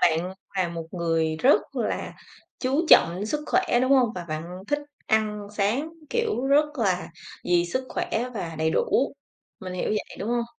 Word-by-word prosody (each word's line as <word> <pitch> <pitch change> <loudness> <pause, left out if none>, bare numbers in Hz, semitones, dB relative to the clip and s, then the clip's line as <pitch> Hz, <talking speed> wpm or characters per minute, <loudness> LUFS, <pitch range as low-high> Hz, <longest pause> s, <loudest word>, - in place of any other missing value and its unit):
bạn 175 +3 +2 0.2
là 185 -2 +1
một 165 -1 -6
người 165 -2 0
rất 255 - +3
là - - -2 0.4
chú 275 +6 0
trọng 180 +5 +6
sức 300 +5 -1
khỏe, 370 -10 +2
đúng 260 +2 +3
hông? 250 -4 +4
Và 180 - -5
bạn 170 +4 -5
thích 290 0 +1 0.3
ăn 210 -1 +1
sáng, 220 +10 0 0.2
kiểu, 455 - 0
rất 285 +2 +5
là 185 -6 0 0.3
vì 175 -1 +3
sức 255 +9 -2
khỏe 240 +3 -2
và 165 -5 -4
đầy 160 0 +2
đủ, 270 +11 +1 0.5
mình 185 -1 -6
hiểu 180 - -2
vậy, 215 - -3
đúng 205 - -4
hông? 240 -1 +1
205 Hz, 175 wpm, -25 LUFS, 175-255 Hz, 0.5 s, trọng